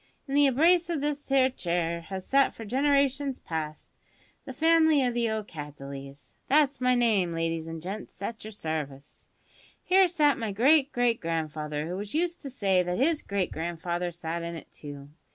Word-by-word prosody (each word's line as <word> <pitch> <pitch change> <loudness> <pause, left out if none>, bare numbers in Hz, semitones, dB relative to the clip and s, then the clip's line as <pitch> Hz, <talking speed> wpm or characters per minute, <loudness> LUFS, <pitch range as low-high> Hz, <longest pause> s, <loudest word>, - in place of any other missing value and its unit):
In 270 - -5
the 285 0 +5
embrace 335 +6 +4
o' 335 - 0
this 290 0 -3
'ere 265 -1 +4
chair 170 -5 -2
has 190 +2 -7
sat 275 0 +3
for 225 - -8
generations 275 +2 +1
past 155 -2 -5 0.5
the - - -6
family 315 -1 +4
o' 245 - +1
the 235 -1 0 0.2
Cattleys 140 -3 -9
that's 285 -1 +3
my 250 0 +3
name, 210 -8 +2
ladies 165 0 -2
an 165 0 -6
gents, 195 +5 -7
at 220 +3 -5
your 215 - -7
service. 155 -8 -6 0.6
Here 380 0 +5
sat 300 -5 +2
my 225 -3 -2
great 280 +6 +4
great 245 -1 +1
grandfather, 155 -2 -3
who 180 +2 -4
was 205 +4 -6
used 345 +1 0
to 275 - -6
say 195 -8 +2
that 180 0 -2
his 305 +4 +2
great 200 -3 -2
grandfather 175 +2 -3
sat 170 0 -4
in 170 0 -5
it 165 - -10
too. 145 -1 -10
205 Hz, 175 wpm, -28 LUFS, 165-275 Hz, 0.6 s, the